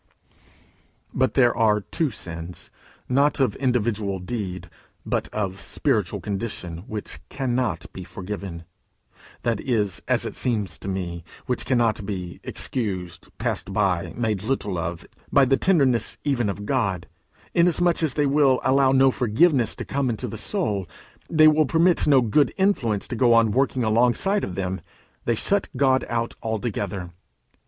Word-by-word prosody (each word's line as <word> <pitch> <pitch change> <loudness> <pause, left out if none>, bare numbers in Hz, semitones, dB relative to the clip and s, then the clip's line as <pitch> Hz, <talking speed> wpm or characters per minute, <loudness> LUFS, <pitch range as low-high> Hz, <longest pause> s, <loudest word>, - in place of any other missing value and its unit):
But 130 0 +1
there 120 -3 +4
are 105 -2 +3
two 155 +9 -1
sins, 85 -5 -7 0.4
not 140 +4 +2
of 135 - +2
individual 110 -6 0
deed, 95 -1 -5 0.4
but - - -1
of 100 -2 -3
spiritual - - 0
condition, 100 -5 -4
which 105 -9 -6
cannot 130 -2 -1
be 95 - -7
forgiven; 95 -2 -7 0.8
that 115 -3 0
is, 105 - -1
as - - +2
it - - -4
seems 105 -9 -1
to - - -8
me, 90 -3 -4 0.2
which 125 - -2
cannot 115 -5 +2
be 90 -4 -5
excused, 95 -8 -3
passed - - -2
by, 90 -4 +1
made 110 -5 -1
little 105 -6 -2
of 85 0 -4 0.3
by 140 - +5
the 135 +1 +3
tenderness 135 - +2
even 125 -7 0
of 105 +1 -5
God, 100 -7 0 0.5
inasmuch 175 0 +3
as 155 -6 0
they 150 - +2
will 140 -2 +3
allow 135 0 +4
no 135 0 +5
forgiveness 125 +2 +2
to - - -6
come 135 -2 -1
into 110 -3 -3
the - - -6
soul, 100 -4 -1 0.4
they 155 -1 +6
will 155 -1 +4
permit 170 +3 +3
no 140 -3 +6
good 125 +4 +2
influence 125 - +1
to - - -4
go 120 -1 +4
on 115 -2 +4
working 130 +1 +1
alongside 125 - +2
of 90 - -4
them; 95 0 -3 0.4
they 120 - +2
shut 200 - 0
God 130 -1 +3
out 115 0 -1
altogether. 105 -5 -3
115 Hz, 150 wpm, -24 LUFS, 100-135 Hz, 0.8 s, they